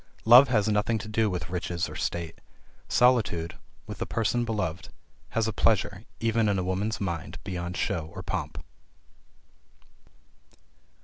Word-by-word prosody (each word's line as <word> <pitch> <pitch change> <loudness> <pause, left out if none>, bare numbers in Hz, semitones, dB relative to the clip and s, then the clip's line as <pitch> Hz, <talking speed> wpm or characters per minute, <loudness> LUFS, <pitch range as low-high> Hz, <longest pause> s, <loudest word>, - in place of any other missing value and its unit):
Love 125 +5 +9
has 110 -5 +2
nothing 105 +2 +1
to 105 - -7
do 110 0 +1
with 90 -1 -4
riches 90 -1 -2
or - - -9
state. 85 -2 -4 0.5
Solitude, 110 -10 +2 0.3
with - - -8
the - - -3
person 115 +2 0
beloved, 105 -8 -3 0.4
has 115 -1 0
a 110 - -2
pleasure, 105 -1 +1
even 115 -1 +2
in 100 - +1
a 95 - 0
woman's 95 +4 -1
mind, 85 -6 -4
beyond 90 0 -4
show 80 -2 -2
or - - -6
pomp. - - -4
105 Hz, 140 wpm, -27 LUFS, 90-115 Hz, 0.5 s, Love